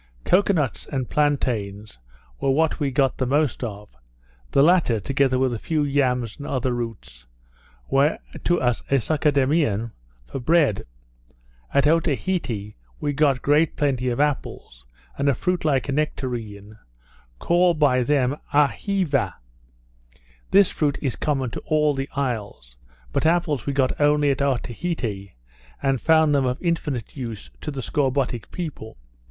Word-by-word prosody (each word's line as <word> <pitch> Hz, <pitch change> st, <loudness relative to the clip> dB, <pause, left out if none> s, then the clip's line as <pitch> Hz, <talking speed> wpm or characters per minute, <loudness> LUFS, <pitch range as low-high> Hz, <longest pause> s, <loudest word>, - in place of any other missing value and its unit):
Cocoa 200 Hz, +2 st, +3 dB
nuts 150 Hz, -, -1 dB
and 130 Hz, -3 st, -3 dB
plantains 110 Hz, -, -1 dB, 0.4 s
were 135 Hz, -, 0 dB
what 155 Hz, +5 st, +2 dB
we 145 Hz, -2 st, 0 dB
got 135 Hz, -1 st, +1 dB
the 130 Hz, -, 0 dB
most 145 Hz, -1 st, +1 dB
of; 105 Hz, -2 st, -6 dB, 0.6 s
the 140 Hz, -, +4 dB
latter, 160 Hz, -9 st, +3 dB
together 135 Hz, +4 st, +1 dB
with 130 Hz, -1 st, +1 dB
a 115 Hz, -, -4 dB
few 155 Hz, +3 st, -1 dB
yams 125 Hz, -5 st, 0 dB
and 145 Hz, -, -7 dB
other 130 Hz, -1 st, -1 dB
roots, 115 Hz, -, -6 dB, 0.6 s
were 140 Hz, +3 st, +2 dB, 0.3 s
to 175 Hz, 0 st, +2 dB
us 120 Hz, -2 st, 0 dB
a 140 Hz, -, +3 dB
succedaneum 140 Hz, -5 st, +1 dB, 0.3 s
for 135 Hz, -, -6 dB
bread. 145 Hz, -, +2 dB, 0.8 s
At 140 Hz, -, +3 dB
Otaheite 150 Hz, -, 0 dB, 0.3 s
we 145 Hz, -, -1 dB
got 140 Hz, -3 st, +2 dB
great 150 Hz, +2 st, +3 dB
plenty 130 Hz, -4 st, 0 dB
of 120 Hz, -, -2 dB
apples, 130 Hz, -, -2 dB, 0.3 s
and 140 Hz, 0 st, +2 dB
a 135 Hz, -, +2 dB
fruit 180 Hz, +7 st, -1 dB
like 140 Hz, -4 st, +1 dB
a -, -, -1 dB
nectarine, 115 Hz, -8 st, -4 dB, 0.6 s
called 175 Hz, -, +2 dB
by 135 Hz, -4 st, +3 dB
them 140 Hz, +1 st, +1 dB
Aheeva. 145 Hz, -, +1 dB, 1.1 s
This 195 Hz, -1 st, +5 dB
fruit 145 Hz, -2 st, 0 dB
was 135 Hz, -4 st, -1 dB
common 135 Hz, -5 st, -1 dB
to -, -, -5 dB
all 150 Hz, -1 st, +1 dB
the 135 Hz, 0 st, -4 dB
isles; 105 Hz, -, -4 dB, 0.4 s
but -, -, +2 dB
apples 160 Hz, -7 st, +1 dB
we 140 Hz, -, 0 dB
got 135 Hz, +1 st, 0 dB
only 145 Hz, -1 st, +4 dB
at 140 Hz, -, -2 dB
Otaheite, 120 Hz, -, -2 dB, 0.5 s
and 135 Hz, -3 st, +1 dB
found 160 Hz, -2 st, +4 dB
them 135 Hz, -2 st, +2 dB
of 125 Hz, +1 st, -2 dB
infinite 155 Hz, -, -2 dB
use 115 Hz, -6 st, -7 dB
to -, -, -5 dB
the 135 Hz, -3 st, -5 dB
scorbutic 135 Hz, -5 st, -1 dB
people. 150 Hz, -10 st, -7 dB
140 Hz, 145 wpm, -23 LUFS, 120-150 Hz, 1.1 s, This